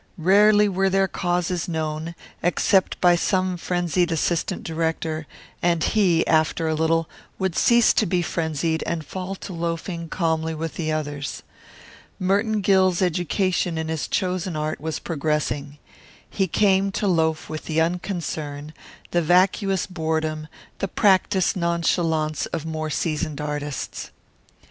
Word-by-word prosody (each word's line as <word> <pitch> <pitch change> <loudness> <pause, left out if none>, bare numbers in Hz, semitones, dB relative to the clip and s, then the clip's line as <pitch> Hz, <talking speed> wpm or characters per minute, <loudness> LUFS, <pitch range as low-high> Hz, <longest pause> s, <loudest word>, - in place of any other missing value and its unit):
Rarely 205 +4 +5
were 195 0 +1
their 195 0 +2
causes 175 -1 -1
known, 160 0 -3 0.3
except 190 +2 +2
by 175 -1 +5
some 185 +1 0
frenzied 175 0 0
assistant 170 +3 -1
director, 160 -1 -2 0.3
and 170 -2 +2
he, 180 -7 +3
after 160 0 +2
a 160 - +1
little, 160 +1 +1 0.3
would 190 -3 -1
cease 235 -1 +5
to 215 - +2
be 175 0 +1
frenzied 160 -1 -1
and 165 -2 -2
fall 190 +3 -5
to 190 - -8
loafing 170 0 -4
calmly 160 -2 -1
with 160 0 -4
the 155 -2 -2
others. 145 -2 -4 0.7
Merton 205 +3 +1
Gill's 185 -2 +3
education 180 0 0
in 160 0 -3
his 160 -2 -2
chosen 185 -2 -1
art 155 0 -3
was 160 0 -3
progressing. 150 -2 -2 0.5
He 195 -2 -1
came 195 +1 +2
to 210 - -1
loaf 160 -4 +1
with 155 0 -6
the 160 0 0
unconcern, 160 -4 -3 0.4
the 175 - +2
vacuous 185 +3 +2
boredom, 160 -3 -2 0.3
the 195 - -1
practised 190 0 +2
nonchalance, 170 -3 0
of 165 -2 -4
more 155 -1 -3
seasoned 155 -1 -2
artists. 150 -1 -4
170 Hz, 135 wpm, -23 LUFS, 160-185 Hz, 0.7 s, Rarely